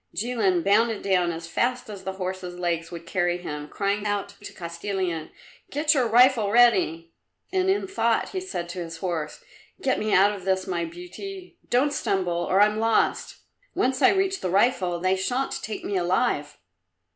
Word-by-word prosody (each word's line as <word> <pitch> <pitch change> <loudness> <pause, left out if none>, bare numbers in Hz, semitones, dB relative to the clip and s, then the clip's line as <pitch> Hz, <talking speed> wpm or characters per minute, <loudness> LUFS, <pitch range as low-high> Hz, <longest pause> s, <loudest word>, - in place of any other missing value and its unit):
Jilin 205 -7 +1
bounded 220 +2 +2
down 180 -3 +2
as 165 0 -6
fast 245 +9 -1
as 200 -3 -8
the 190 +1 -4
horse's 185 -1 -5
legs 170 -2 -2
would 170 -1 -8
carry 175 0 0
him, 150 -4 -6
crying 200 +4 -1
out 205 -1 -1
to 205 - -8
Kostilin, 170 -1 -4 0.4
"Get 295 +1 +2
your 260 -5 +2
rifle 240 -2 +5
ready!" 185 -8 +3 0.4
And 375 0 +2
in 390 +1 +1
thought 235 - 0
he 375 - -4
said 270 - -5
to 180 +1 -6
his 165 0 -8
horse, 165 - -4 0.4
"Get 270 -8 0
me 215 0 -1
out 200 +2 +5
of 195 -3 -8
this, 190 0 0
my 175 -3 -2
beauty; 345 - -9
don't 275 +4 +2
stumble, 190 -9 0 0.2
or 190 +2 +4
I'm 210 +1 +3
lost. 225 0 +1 0.3
Once 260 0 0
I - - +7
reach 385 0 +1
the 185 - -2
rifle, 185 -3 +2
they 185 +2 +2
shan't 250 +8 -2
take 215 - -6
me 200 - -1
alive!" 175 -4 0
195 Hz, 175 wpm, -25 LUFS, 175-240 Hz, 0.4 s, I